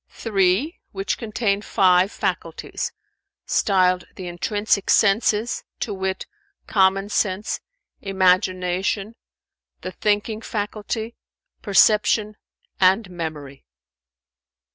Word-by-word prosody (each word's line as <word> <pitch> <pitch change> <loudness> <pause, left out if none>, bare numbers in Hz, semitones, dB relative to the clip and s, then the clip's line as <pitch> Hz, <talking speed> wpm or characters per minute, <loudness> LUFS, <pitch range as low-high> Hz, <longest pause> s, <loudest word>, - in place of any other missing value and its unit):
"Three, 205 - 0
which 195 0 -2
contain 210 -3 -1
five 185 -1 +3
faculties, - - -3 0.5
styled 185 -2 +2
the 185 - -7
intrinsic 200 +3 -1
senses, 220 +2 +2 0.2
to 210 - -3
wit, 190 -1 -3 0.4
common 195 0 +2
sense, 205 -1 -1 0.4
imagination, 185 +1 +1 0.7
the 185 - -5
thinking 210 +3 -1
faculty, 220 +1 -4 0.5
perception 210 +1 +3 0.4
and 190 +1 +3
memory." 155 -5 -6
195 Hz, 80 wpm, -22 LUFS, 185-215 Hz, 0.7 s, five